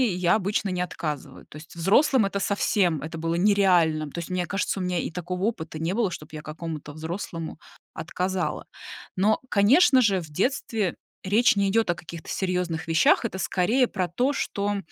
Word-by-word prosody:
я 180 -1 +3
обычно 205 0 -1
не 180 -1 -2
отказываю. 155 -5 -5
То - - -12
есть 160 +3 -13
взрослым- 220 - +3
это 200 0 -2
совсем, 190 -5 +1
это 160 +3 -6
было 165 +1 -1
нереальным. 175 -5 +3
То 170 - -5
есть, 170 - -6
мне 180 -1 -1
кажется, 195 +1 -2
у - - -2
меня 180 -1 -1
и - - -3
такого 180 +2 -4
опыта 165 -8 -3
не 165 +3 -1
было, 215 -3 0
чтоб 170 -3 -8
я 155 0 -7
какому-то 155 -1 -6
взрослому 165 +1 -6 0.3
отказала. 185 0 -3 0.5
Но, 210 +4 +2
конечно 260 - +5
же, 195 -6 +2
в 160 - -10
детстве 205 - -1 0.3
речь 220 +5 +4
не 200 -1 +2
идёт 225 +3 +2
о - - -2
каких-то 165 -1 -10
серьёзных 180 -4 -2
вещах, 165 -1 +4
это 190 - -3
скорее 220 +8 +2
про 185 -5 -2
то, 250 - 0
что, 205 -6 -2
180 Hz, 180 wpm, -25 LUFS, 165-200 Hz, 0.5 s, конечно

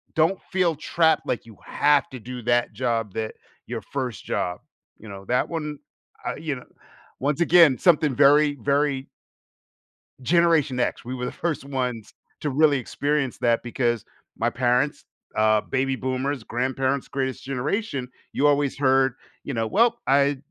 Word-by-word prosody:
don't 165 +4 +2
feel 180 -3 +2
trapped 160 +1 +1
like 120 - -2
you 110 -3 -14
have 145 -1 +2
to 130 - -8
do 125 +2 -7
that 120 0 +1
job 115 -3 -1
that 110 -1 -4 0.3
your - - -4
1st 125 - -5
job. 90 0 -2 0.4
You 110 - -12
know, 100 0 -9
that 125 +5 +1
one, 150 -3 -4 0.5
uh, - - -2
you 155 -4 -3
know, 125 - -11 0.5
once 145 +3 0
again, 170 -5 +6
something 150 -7 +3
very, 145 +1 +5
very 140 -1 +1 1.1
Generation 160 -3 +3
X. 120 - -1
We 130 +1 -4
were 125 - -4
the - - -3
first 160 -5 -3
ones 125 -5 -3 0.3
to 150 - -1
really 145 +1 +4
experience 145 +1 -1
that, 115 -1 +2
because 120 -2 -1 0.3
my 115 +1 +1
parents 125 +4 0 0.3
uh, 110 0 +4
baby 135 +3 -1
boomers, 130 0 -2
grandparents- 130 +2 -1
greatest 130 -2 -3
generation 135 - -2 0.2
you 145 - +2
always 145 -2 +2
heard, 135 -1 +3 0.3
you 140 - -5
know, 115 -2 -1
"Well, 235 - +3
I 140 +1 +3
135 Hz, 155 wpm, -24 LUFS, 125-150 Hz, 1.1 s, again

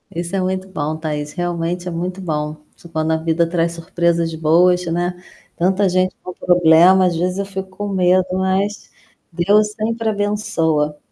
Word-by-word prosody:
Isso 175 +3 -3
é 190 - +1
muito 185 +1 -2
bom, 155 -3 -3
Thaís, 150 -2 -4
realmente 175 0 -3
é - - -3
muito 180 +3 -4
bom. 150 -2 -3 0.2
Sup 170 - -16
quando 160 0 -1
a 160 - +2
vida 165 +1 0
traz 170 -1 0
surpresas 170 0 -1
boas, 175 +3 +3
né. 175 +1 -2 0.3
Tanta 190 +3 +2
gente 185 0 +1
com 180 - -7
problema, 175 +2 +5
às 175 -2 +1
vezes 180 +3 -1
eu 200 - -1
fico 190 -1 -6
com 205 +2 -6
medo, 185 -1 +3
mas 190 +2 -1 0.4
Deus 205 +5 +2
sempre 225 +1 -2
abençoa. 200 -8 0
180 Hz, 165 wpm, -19 LUFS, 165-190 Hz, 0.4 s, problema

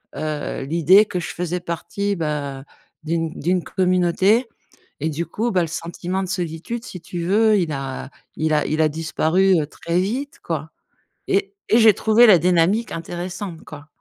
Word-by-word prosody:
heu, 150 -3 -3
l'idée 170 +7 +5
que 185 -4 -3
je - - -5
faisais 180 0 -3
partie, 200 +4 -3
bah, 145 -4 -3 0.4
d'une 165 0 -1
d'une 180 +2 0
communauté 185 +5 +2 0.5
et 155 +2 -1
du 165 +3 -3
coup, 225 +8 -2
bah, 185 -4 +2
le - - -1
sentiment 175 +3 -4
de 185 - -4
solitude, 180 +6 -4
si 180 - -8
tu 175 0 -6
veux, 215 +3 +4
il 165 -4 -1
a 135 -1 -5 0.3
il 155 0 +1
a 150 - +2
il 155 +1 -1
a 155 - +4
disparu, 165 +4 +2
heu, 145 - -2
très 170 +3 -2
vite, 255 +9 -3
quoi 160 -1 -4 0.6
et 195 0 0
et 225 - +5
j'ai 220 -3 +7
trouvé 220 +3 +5
la 190 -6 +7
dynamique 180 +7 +2
intéressante, 175 +1 -6
quoi. 150 0 -11
175 Hz, 170 wpm, -21 LUFS, 160-195 Hz, 0.6 s, j'ai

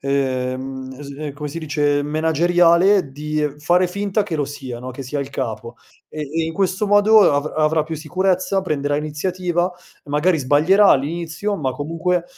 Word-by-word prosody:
ehm, 130 -2 -1
mhmm, 130 0 -8
s 140 -1 -9
ehm, 145 +1 -6
come 150 +1 -6
si 165 - -5
dice, 145 -2 0
manageriale, 170 +3 +3
di 150 +1 -2
fare 175 +4 +2
finta 200 +3 -1
che 200 -5 -5
lo 145 -3 -1
sia, 130 -4 -7
no, 125 +1 -7
che 130 +2 -7
sia 140 +3 -4
il 135 - -5
capo. 115 -3 -5 0.3
E 155 - -6
e 160 +3 -2
in 160 0 -4
questo 190 +2 0
modo 205 0 +6
avr 145 +1 -1
avrà 155 0 +2
più 160 +1 -5
sicurezza, 185 +4 0
prenderà 145 -4 -1
iniziativa, 175 +4 -1 0.3
magari 150 +4 +1
sbaglierà, 155 +9 +4
all'inizio, 165 +8 0
ma 145 -8 -2
comunque, 165 +5 -1
155 Hz, 170 wpm, -20 LUFS, 145-180 Hz, 0.3 s, modo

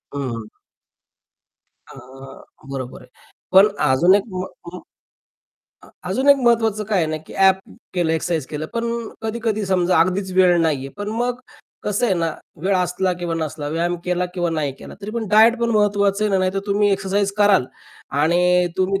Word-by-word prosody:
हं, - - -3 0.2
हं. 110 -1 -9 1.4
अ, - - -13 0.8
बरोबर 130 -2 -6
आहे. - - -17 0.4
पण 190 +2 +7 0.2
अजून 175 +9 +5
एक 200 - +1
म 185 0 -3 0.3
म् 180 - -7 1.1
अ, - - -17 0.2
अजून 270 +2 0
एक 280 - +8
महत्वाचं 225 -4 +1
काय 205 -1 0
आहे 165 - +1
ना, 155 - -2
की - - -12
ॲप 190 -1 +5 0.4
केलं 175 -3 +1
एक्सरसाइज 160 -3 -1
केलं 155 +2 -5
पण 230 0 -1 0.4
कधी-कधी 220 -1 -2
समजा 185 -2 +2
अगदीच 185 +3 0
वेळ 180 -1 +4
नाही 160 -4 +1
आहे. 135 - -7
पण 205 0 -5
मग 245 0 -2 0.5
कसं 210 +3 0
आहे 195 - +2
ना, 170 -2 0 0.4
वेळ 195 +2 +1
असला 180 +1 0
किंवा 170 -1 -2
नसला, 155 -2 -4
व्यायाम 170 +3 -1
केला 180 0 0
किंवा 175 -2 -1
नाही 150 -4 -2
केला, - - -11
तरी 205 - -6
पण 225 0 -3
डायट 220 +3 +5
पण 235 0 +1
महत्वाचं 205 -1 +2
आहे 210 - +1
ना, 190 - +3
नाहीतर 185 +1 0
तुम्ही 205 +1 +2
एक्सरसाइज 195 +1 0
कराल 205 -8 +4 0.6
आणि 180 +2 +3
तुम्ही 190 +1 0
190 Hz, 175 wpm, -20 LUFS, 170-210 Hz, 1.4 s, एक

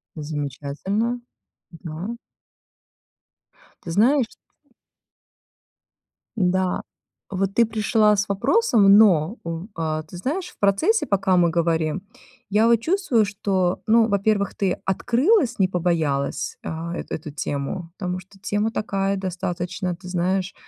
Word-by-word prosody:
Замечательно, 155 - -3 0.5
да. 170 +6 -6 1.7
Ты 170 - -7
знаешь 240 - +3 2.1
Да, 185 -2 +1 0.5
вот 195 0 -1
ты 235 - +5
пришла 215 -1 +3
с 200 +1 -1
вопросом, 210 - +4
но 195 -2 +5
в 170 +3 -5
а, 155 -1 -2
ты 155 +3 -12
знаешь, 310 - -3
в - - -18
процессе, 200 - +2
пока 190 -2 +2
мы 175 -1 +4
говорим, 165 +1 0 0.5
я 215 +3 +4
вот 235 - +6
чувствую, 320 - +2
что, 195 -3 -1
ну, 225 0 +5
во-первых, 200 0 +1
ты 190 -3 0
открылась, 245 - +2
не 190 -2 +3
побоялась, 165 -6 -1
а, 165 +2 -5
эту - - -5
эту 155 -1 -6
тему, 145 +4 -4
потому 180 -2 -3
что 190 +2 -19
тема 205 +2 -1
такая 195 -3 -1
достаточно, 180 -1 -3
ты 180 - -12
знаешь, 185 +2 -1
190 Hz, 120 wpm, -23 LUFS, 170-215 Hz, 2.1 s, вот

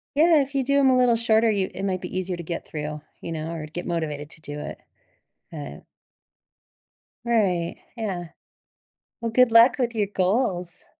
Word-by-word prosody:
Yeah, 320 0 +5
if 280 +1 -5
you 270 - +2
do 280 +2 +2
'em 270 -1 +5
a 255 - +4
little 245 -2 +4
shorter, 225 0 +3
you 195 -2 0
it 190 - -6
might 185 -2 -1
be 180 - -6
easier 185 -1 -2
to 170 - -6
get 170 +1 -5
through, 150 0 -5 0.2
you 165 - -6
know, 160 +1 -4
or 160 -2 -5
get 175 +3 -6
motivated 150 -4 -3
to 160 - -10
do 150 -1 -6
it, - - -7 0.7
but 70 0 -8 1.4
Right, 190 -8 +1 0.2
yeah. 185 -7 -3 0.9
Well, 230 -1 -2
good 250 0 +5
luck 230 +3 +7
with 240 -1 0
your 210 -2 +1
goals. 185 -3 0
185 Hz, 180 wpm, -24 LUFS, 165-235 Hz, 1.4 s, luck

